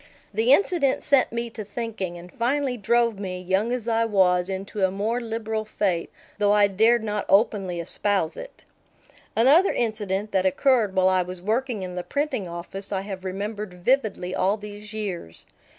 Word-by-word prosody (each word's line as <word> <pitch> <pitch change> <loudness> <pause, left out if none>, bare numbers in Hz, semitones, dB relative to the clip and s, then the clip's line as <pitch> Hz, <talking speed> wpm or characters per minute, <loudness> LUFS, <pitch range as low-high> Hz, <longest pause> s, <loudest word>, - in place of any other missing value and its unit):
The 225 +5 +2
incident 285 -4 +3
set 275 -2 +3
me 235 0 -3
to 220 - -6
thinking, 205 -4 -5
and 175 +1 -12
finally 260 +2 0
drove 235 0 +1
me, 185 -2 -4
young 190 +5 0
as 245 -2 -3
I 230 0 +2
was, 185 -4 +2
into 195 +1 -4
a 190 - +4
more 215 +6 -1
liberal 220 -1 -3
faith, 195 -5 -1 0.3
though 205 0 +4
I 205 -1 +5
dared 220 +4 +3
not 210 -1 -2
openly 195 -4 +2
espouse 180 0 0
it. - - -10 0.7
Another 285 - +5
incident 210 -3 -2
that 190 0 +2
occurred 215 0 +2
while 185 0 +4
I 185 -1 +3
was 180 0 -6
working 220 +2 -1
in 180 -1 -5
the 180 - -3
printing 280 -3 -2
office 175 +4 -6
I 195 -1 -1
have 195 -2 -7
remembered 200 +1 -4
vividly 205 -2 0
all 195 +3 +1
these 210 0 -9
years. 195 - -5
210 Hz, 170 wpm, -24 LUFS, 190-230 Hz, 0.7 s, I